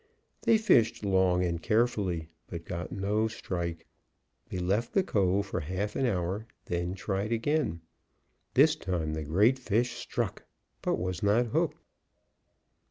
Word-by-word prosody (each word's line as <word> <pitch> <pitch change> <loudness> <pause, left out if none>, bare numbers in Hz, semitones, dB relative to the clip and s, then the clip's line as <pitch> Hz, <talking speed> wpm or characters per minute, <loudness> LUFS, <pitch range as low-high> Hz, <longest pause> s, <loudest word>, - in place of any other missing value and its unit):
They 225 - +5
fished 115 - +3
long 95 -2 +3
and 85 -2 -1
carefully, 100 -7 +1 0.2
but 85 -1 -7
got 85 0 -5
no 105 +3 0
strike. 85 -6 -4 0.6
They - - -4
left 100 +6 0
the 195 - +4
cove 100 - +1
for 95 - -3
half 95 +6 -3
an 135 - +1
hour, 95 +1 -1 0.2
then 85 +1 -2
tried 100 +2 -2
again. 115 - 0 0.7
This - - +6
time 85 -5 -2
the 80 0 -3
great 105 - +3
fish 120 0 +1
struck, 120 -4 -3 0.4
but - - +1
was 90 -1 -3
not 105 +4 +3
hooked. - - +1
95 Hz, 140 wpm, -29 LUFS, 90-110 Hz, 0.7 s, This